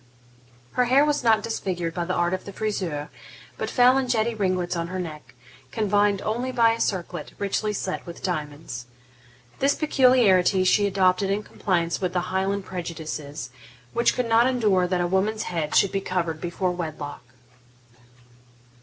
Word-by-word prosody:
Her 250 - +2
hair 265 +4 +5
was 295 -3 0
not 220 -2 +4
disfigured 175 -7 -3
by 175 0 -2
the 180 - -2
art 175 +1 +1
of 185 - -3
the 200 - -7
friseur, 185 -8 -3 0.5
but - - -4
fell 250 +1 +5
in 260 - -2
jetty 235 -1 +1
ringlets 185 -4 -1
on 170 0 -2
her 185 +2 -5
neck, 155 -6 -7 0.4
confined 205 +2 +1
only 240 +4 -2
by 230 -2 +4
a 230 - -3
circlet, 175 -4 -3
richly 205 +1 -1
set 190 -2 -3
with 170 - -9
diamonds. 150 -8 -4 0.7
This 275 +1 +3
peculiarity 240 - +4
she 205 +2 +3
adopted 190 0 +2
in 200 +2 0
compliance 170 -4 -1
with 180 -2 -1
the 180 0 -2
Highland 195 +1 0
prejudices, 155 -5 -6 0.4
which 235 - +2
could 250 -2 -1
not 230 +2 +4
endure 210 -8 +2
that 180 -1 0
a - - +1
woman's 200 +4 0
head 160 -4 -3
should 200 - +4
be 195 - -1
covered 170 -4 -2
before 180 +1 -1
wedlock. 155 -4 -5
190 Hz, 165 wpm, -24 LUFS, 175-220 Hz, 0.7 s, hair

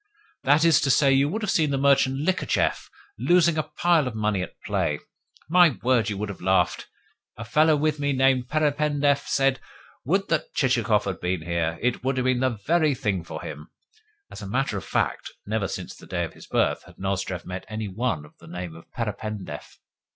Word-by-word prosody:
"That 150 +4 +4
is 165 -3 +5
to 140 - 0
say, 135 +1 +4
you 135 +2 +3
would 215 +6 -3
have 205 - 0
seen 155 -3 +2
merchant 135 -1 +3
Likhachev 185 +1 0 0.3
losing 175 -2 +4
a 155 - +1
pile 155 0 +1
of 120 - -5
money 105 -3 0
at - - -7
play. - - 0 0.5
My 170 -3 +5
word, 120 -4 +2
you 100 - -3
would 105 +1 -3
have 100 - -8
laughed! 95 +1 +1 0.5
A 115 - -6
fellow 155 +6 +4
with 150 0 0
me 145 0 0
named 130 -1 +2
Perependev 145 -2 +1
said: 135 -1 +2 0.5
'Would 195 +7 +1
that 160 -2 -1
Chichikov 115 -6 +2
had 95 -3 -3
been 90 -2 -2
here! 85 -1 -1
It 125 0 0
would 130 0 0
have 130 - +1
been 130 -1 +2
the 130 -3 0
very 155 -4 +3
thing 100 -7 -1
for 80 - -7
him!'" 75 0 -8 0.6
(As - - -9
a 100 - -6
matter 125 +2 -1
of 95 - -5
fact, - - -1
never 105 -1 -1
since - - -6
the - - -15
day - - -2
of - - -6
his - - -14
birth - - 0
had - - -17
Nozdrev 95 -2 -3
met 90 0 -6
any 110 0 -4
one 95 -6 -2
of 75 - -19
the - - -15
name 90 -2 -6
of 80 - -15
Perependev.) 105 -7 -5
130 Hz, 200 wpm, -25 LUFS, 100-150 Hz, 0.6 s, is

